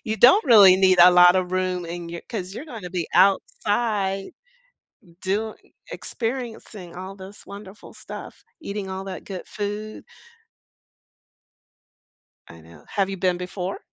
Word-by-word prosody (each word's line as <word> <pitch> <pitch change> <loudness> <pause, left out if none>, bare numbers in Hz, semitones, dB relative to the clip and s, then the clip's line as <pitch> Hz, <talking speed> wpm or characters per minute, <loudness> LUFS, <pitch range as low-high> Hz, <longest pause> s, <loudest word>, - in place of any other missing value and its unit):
you 220 -2 -2
don't 260 - +6
really 205 -8 +8
need 185 -2 +4
a 180 +1 +9
lot 180 0 +7
of 185 -1 0
room 185 -1 -1
in 170 0 -7
your 170 0 -7
cause 190 -4 -5
you're 275 - -7
gonna 220 - -9
be 175 -3 -3
outside 200 - +1 0.9
doi 210 +3 -2 0.4
experiencing 225 -7 -6
all 190 +2 -8
this 190 +2 -12
wonderful 200 0 -12
stuff, - - -10 0.2
eating 200 -7 -5
all 190 0 -5
that 190 -1 -8
good 190 -3 -7
food." 210 +1 -6 2.4
I 85 - -14
know. 80 -1 -17
Have 195 -1 -1
you 195 - -4
been 180 -1 0
before? 180 +1 -5
190 Hz, 140 wpm, -23 LUFS, 180-215 Hz, 2.4 s, a